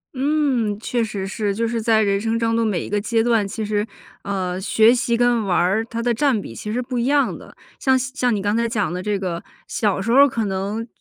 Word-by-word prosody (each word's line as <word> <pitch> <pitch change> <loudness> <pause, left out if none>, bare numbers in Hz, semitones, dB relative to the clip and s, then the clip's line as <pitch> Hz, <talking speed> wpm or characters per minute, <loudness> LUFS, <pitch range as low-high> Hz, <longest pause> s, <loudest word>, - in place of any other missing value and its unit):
嗯， 260 -7 0
确 235 +1 -1
实 205 -3 -4
是， 200 0 -2
就 230 +2 0
是 230 0 -2
在 220 -1 +3
人 200 -1 +1
生 225 +1 0
中 230 0 0
的 230 - +2
每 205 -7 0
一 - - -7
个 205 0 0
阶 225 +1 +1
段， 225 -4 +2
其 215 +2 -4
实， 210 0 0 0.4
呃， 185 -2 -3
学 220 +4 +4
习 235 -1 0
跟 240 -1 +2
玩 185 -3 +1
儿 195 +5 +2
它 230 0 -5
的 240 0 +2
占 255 -1 +2
比 155 - -8
其 210 - -6
实 235 - -1
不 250 0 -3
一 235 - 0
样 280 -1 +2
的， - - -13 0.2
像 265 -1 +3
像 255 -2 -1
你 - - -1
刚 205 +2 0
才 235 0 +1
讲 210 -6 -1
的 180 - -3
这 205 +1 -1
个， 180 -2 -4 0.2
小 205 -4 0
时 210 +4 -1
候 260 - +5
儿 280 0 +7
可 230 -4 -2
能 200 +4 -3
225 Hz, 265 characters per minute, -21 LUFS, 200-240 Hz, 0.4 s, 儿